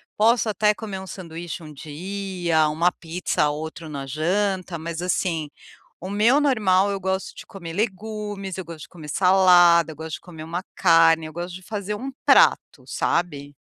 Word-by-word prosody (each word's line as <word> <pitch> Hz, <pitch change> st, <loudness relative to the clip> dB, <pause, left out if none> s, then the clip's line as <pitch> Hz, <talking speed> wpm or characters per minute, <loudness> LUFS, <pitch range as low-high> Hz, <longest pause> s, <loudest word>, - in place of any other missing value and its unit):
Posso 230 Hz, +2 st, +3 dB
até 210 Hz, 0 st, +2 dB
comer 205 Hz, -3 st, -6 dB
um 190 Hz, -, -9 dB
sanduíche 170 Hz, -2 st, -7 dB
um 155 Hz, -1 st, -10 dB
dia, 170 Hz, +1 st, -1 dB
uma 170 Hz, +4 st, +1 dB
pizza 165 Hz, -2 st, -1 dB
ou 145 Hz, +1 st, -4 dB
outro 160 Hz, +1 st, -7 dB
na 140 Hz, -2 st, -5 dB
janta, 185 Hz, +4 st, -1 dB
mas 165 Hz, +1 st, -5 dB
assim, 170 Hz, -4 st, -1 dB, 0.5 s
o 185 Hz, -, -7 dB
meu 220 Hz, +7 st, +4 dB
normal 205 Hz, -9 st, +3 dB
eu 195 Hz, -, -3 dB
gosto 190 Hz, 0 st, -2 dB
de -, -, -10 dB
comer 180 Hz, -6 st, -9 dB
legumes, 205 Hz, -1 st, -4 dB
eu 185 Hz, -, -4 dB
gosto 165 Hz, -3 st, -10 dB
de -, -, -11 dB
comer 160 Hz, -4 st, -11 dB
salada, 180 Hz, -2 st, +5 dB
eu -, -, -11 dB
gosto 160 Hz, 0 st, -7 dB
de -, -, -12 dB
comer 165 Hz, -4 st, -10 dB
uma 170 Hz, +3 st, -4 dB
carne, 165 Hz, -2 st, +5 dB
eu 155 Hz, -, -9 dB
gosto 175 Hz, +2 st, -5 dB
de 185 Hz, -, -10 dB
fazer 205 Hz, +1 st, -4 dB
um 260 Hz, +6 st, -5 dB, 0.2 s
prato, -, -, +4 dB
sabe. 145 Hz, -5 st, -2 dB
180 Hz, 180 wpm, -23 LUFS, 160-195 Hz, 0.5 s, salada